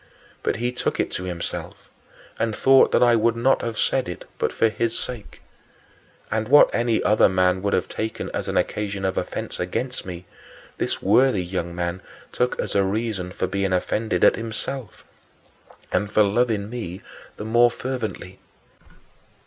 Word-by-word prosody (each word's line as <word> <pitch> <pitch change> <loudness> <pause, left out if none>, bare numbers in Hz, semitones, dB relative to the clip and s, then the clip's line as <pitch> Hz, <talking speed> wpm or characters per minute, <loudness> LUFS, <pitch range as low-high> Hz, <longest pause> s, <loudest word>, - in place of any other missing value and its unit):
But - - 0
he 120 +2 -1
took 125 - -2
it - - 0
to 90 - -4
himself 85 -2 -6 0.5
and 115 -2 0
thought 135 0 +5
that - - +4
I 120 -1 +5
would 115 +1 +2
not 125 +3 +2
have 115 -1 -4
said 130 -8 +1
it 90 - -8
but - - 0
for 115 - +2
his 115 +1 -1
sake. 120 -5 -6 0.9
And 110 0 0
what 145 +4 +6
any 115 -1 +1
other 105 -1 +4
man 95 0 +2
would 100 0 -1
have 90 - +1
taken 110 0 -4
as - - -3
an - - -1
occasion 100 -2 -1
of 95 - 0
offense - - -4
against 125 +8 -3
me, 90 -1 -8 0.5
this - - -2
worthy 110 -1 +4
young 85 -1 -4
man 85 +1 -3 0.3
took 125 0 -1
as - - -2
a 100 - +3
reason 100 -2 -2
for 95 - -2
being 95 0 -1
offended 90 +1 0
at - - +6
himself, 115 0 -5 0.9
and 105 0 0
for 105 - +5
loving 105 0 +1
me 95 -7 -6 0.4
the 105 - -6
more 120 +2 +5
fervently. 115 -7 -5
110 Hz, 165 wpm, -23 LUFS, 95-120 Hz, 0.9 s, what